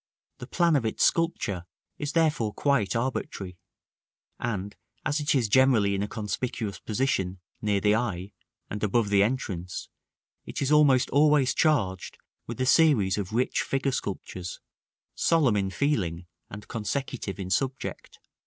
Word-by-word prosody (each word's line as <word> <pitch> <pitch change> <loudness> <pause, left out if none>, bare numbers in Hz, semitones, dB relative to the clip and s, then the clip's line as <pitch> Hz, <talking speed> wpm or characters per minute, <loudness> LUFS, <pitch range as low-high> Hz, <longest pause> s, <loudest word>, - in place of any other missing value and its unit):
The 125 - -8
plan 170 +1 +2
of 135 - +2
its 110 - +1
sculpture 100 - 0 0.3
is 145 0 -3
therefore 150 -10 +1
quite 130 -10 +1
arbitrary; 100 -7 -3 0.8
and, 105 -4 -3 0.3
as 150 +1 +1
it 150 0 +1
is 125 -5 +2
generally 115 -4 +4
in 100 - -1
a 105 - -1
conspicuous 110 0 -4
position, 100 -6 -1 0.2
near 105 -2 +1
the 105 +1 +3
eye, 100 -4 -2 0.3
and 105 - -5
above 105 +1 +1
the 100 -1 +4
entrance, 100 -6 -2 0.5
it - - -6
is 140 0 0
almost 145 -4 +5
always 145 -2 +4
charged 100 - 0 0.3
with 120 0 -6
a 130 - +1
series 125 - +4
of 95 -3 -4
rich 125 +3 +1
figure 135 0 -1
sculptures, 95 -6 -5 0.5
solemn 150 -9 +3
in 100 -1 0
feeling 95 - -1 0.2
and 100 +1 -9
consecutive 115 -2 -4
in 95 -1 -5
subject. 135 +4 -2
115 Hz, 145 wpm, -27 LUFS, 100-135 Hz, 0.8 s, almost